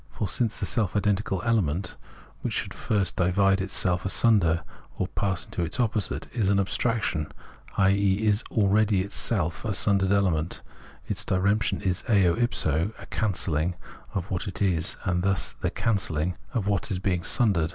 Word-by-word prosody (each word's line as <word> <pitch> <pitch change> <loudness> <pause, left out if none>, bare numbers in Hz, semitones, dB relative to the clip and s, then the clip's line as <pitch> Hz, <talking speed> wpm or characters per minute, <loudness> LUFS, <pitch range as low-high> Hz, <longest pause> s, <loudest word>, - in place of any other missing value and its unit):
For 105 - -3
since 110 +3 0
the - - -1
self 110 -6 -1
identical 105 -2 0
element, 100 -7 0 0.5
which - - -2
should - - -2
first 100 -4 0
divide 95 +1 +2
itself 95 -2 0
asunder 95 -5 +3 0.3
or - - 0
pass 95 -3 -2
into - - -4
its 85 +9 -1
opposite, 110 -4 +1
is 105 -6 +1
an 100 -1 +3
abstraction, 100 -5 0 0.5
i.e. 100 +1 +3
is 105 0 +2
already 105 -1 +3
itself 95 -5 -1
a 105 -3 -1
sundered 95 -1 +2
element, 90 -5 +1 0.4
its - - -2
diremption 100 +4 +1
is 95 -2 0
eo 95 -6 +4
if 120 0 0
so 80 +8 +1
a - - -11
cancelUng 90 -5 -1 0.4
of 95 0 -3
what 95 +3 -2
it 95 - -5
is, 90 -5 +1
and 90 0 0
thus 95 0 -1
the - - +1
cancelhng 90 -6 -1 0.2
of 110 -5 -2
its 100 -1 0
being 90 -1 0
srmdered. 95 -8 +2
95 Hz, 160 wpm, -26 LUFS, 90-105 Hz, 0.5 s, eo